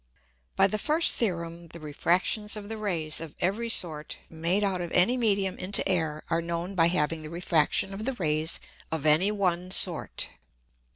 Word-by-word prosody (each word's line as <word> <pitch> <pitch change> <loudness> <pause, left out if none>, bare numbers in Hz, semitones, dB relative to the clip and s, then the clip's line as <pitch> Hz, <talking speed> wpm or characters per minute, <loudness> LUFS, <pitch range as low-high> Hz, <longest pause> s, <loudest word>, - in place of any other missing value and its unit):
By - - +5
the 215 - -1
first 310 +8 +4
Theorem 170 -5 -2
the 170 +1 -10
Refractions 180 +8 -1
of 205 0 -9
the 225 - -5
Rays 165 -7 0
of 165 -3 -9
every 210 +6 -1
sort 160 -8 0
made 170 +5 -1
out 190 -3 -1
of 175 -1 -6
any 185 +8 +4
Medium 200 -6 +1
into 195 +2 +3
Air 160 -5 -1
are 165 0 -1
known 170 +3 -4
by 165 -3 +3
having 165 -2 -1
the 155 - -9
Refraction 170 +2 0
of 210 +3 -6
the 270 - -1
Rays 155 -6 -1 0.3
of 160 -2 -4
any 160 +7 +4
one 185 -3 -1
sort. 180 -2 +2
175 Hz, 175 wpm, -27 LUFS, 165-200 Hz, 0.3 s, By